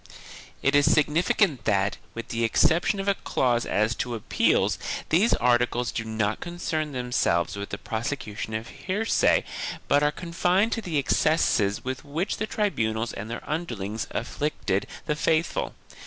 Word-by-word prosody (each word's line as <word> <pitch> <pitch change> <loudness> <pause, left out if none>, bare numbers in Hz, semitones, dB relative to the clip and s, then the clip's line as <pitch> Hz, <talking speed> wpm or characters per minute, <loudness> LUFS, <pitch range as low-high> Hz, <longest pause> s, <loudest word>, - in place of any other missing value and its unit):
It 140 - +3
is 145 +2 +5
significant 150 - +2
that, 100 -1 +1 0.2
with 115 - -6
the 115 0 -1
exception 165 - +3
of 195 - -3
a 200 - +4
clause 120 -9 0
as 110 +3 +1
to 120 -1 -2
appeals, 110 - +1 0.3
these 190 +9 +4
articles 125 0 +2
do 115 - -3
not 110 -1 -1
concern 160 -3 -3
themselves 125 - 0
with 100 0 -5
the - - -4
prose 110 +1 -4
cution 110 -5 -4
of 115 - -12 0.2
heresy 210 +4 +2 0.4
but 145 - +4
are 150 0 +3
confined 180 +6 +1
to 225 - -1
the 175 -7 -2
excesses 130 -8 +2
with 130 0 -4
which 160 +7 -2
the 220 - -2
tribunals 115 - -1
and 105 +3 -6
their 120 - -6
underlings 115 - -3
afflicted 120 -6 -2 0.2
the 150 - 0
faithful. 160 +2 0
130 Hz, 155 wpm, -26 LUFS, 110-165 Hz, 0.4 s, is